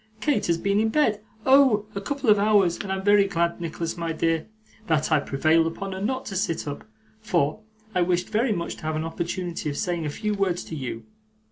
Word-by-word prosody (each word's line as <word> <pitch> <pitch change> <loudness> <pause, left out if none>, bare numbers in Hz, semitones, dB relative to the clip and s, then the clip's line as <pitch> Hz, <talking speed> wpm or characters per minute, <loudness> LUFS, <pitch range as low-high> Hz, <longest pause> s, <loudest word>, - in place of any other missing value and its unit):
'Kate 230 -2 +1
has 170 -1 +2
been 200 +3 +1
in 220 +1 +2
bed 220 -5 +2 0.2
oh! 265 -6 +5
a 200 - -4
couple 280 +3 -3
of 210 -1 +6
hours 200 -4 +3
and 195 - -4
I'm 190 0 -2
very 205 0 +5
glad, 170 -2 -1
Nicholas 165 +1 -4
my 170 -1 -2
dear, 165 0 0 0.4
that 160 0 +1
I 155 - +5
prevailed 160 +4 +2
upon 195 +4 -5
her 190 0 -5
not 255 +5 -2
to 195 - -6
sit 165 -4 -1
up, 145 +6 -6 0.3
for 175 -5 0 0.3
I 180 - +2
wished 175 0 +1
very 225 +3 +1
much 170 -4 -3
to - - -13
have 155 - -1
an 155 +1 -2
opportunity 170 0 -3
of 145 - -4
saying 170 -3 -1
a - - -2
few 210 +8 -2
words 190 -3 0
to 160 - -7
you. 130 -5 -5
180 Hz, 220 wpm, -25 LUFS, 165-210 Hz, 0.4 s, of